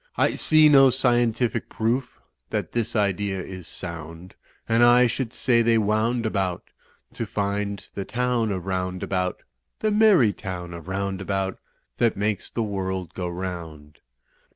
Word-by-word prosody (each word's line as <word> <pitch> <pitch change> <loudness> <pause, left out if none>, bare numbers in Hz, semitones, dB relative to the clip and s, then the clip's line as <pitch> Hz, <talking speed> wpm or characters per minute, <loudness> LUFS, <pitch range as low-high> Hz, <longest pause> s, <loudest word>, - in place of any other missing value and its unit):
I - - +3
see 155 -1 +5
no 135 -2 +7
scientific 120 -2 +1
proof 120 +4 -2 0.3
That - - -3
this 115 0 -2
idea 100 -2 0
is 90 -1 -8
sound, 85 0 -8 0.3
And 115 +1 +3
I 120 +1 +6
should 120 0 -2
say 120 -2 +2
they 115 0 +3
wound 110 +3 +1
about 95 -5 -2 0.4
To - - -4
find 100 0 -2
the 100 - -4
town 120 0 0
of 95 -2 -4
Roundabout, 90 0 -2 0.4
The 215 - 0
merry 205 - +5
town 90 -3 -6
of 85 0 -9
Roundabout 95 0 -2 0.4
That 115 -4 +2
makes 105 0 -1
the 115 - -2
world 95 -4 -3
go 90 -1 -4
round. 85 -5 -7
100 Hz, 140 wpm, -24 LUFS, 95-120 Hz, 0.4 s, no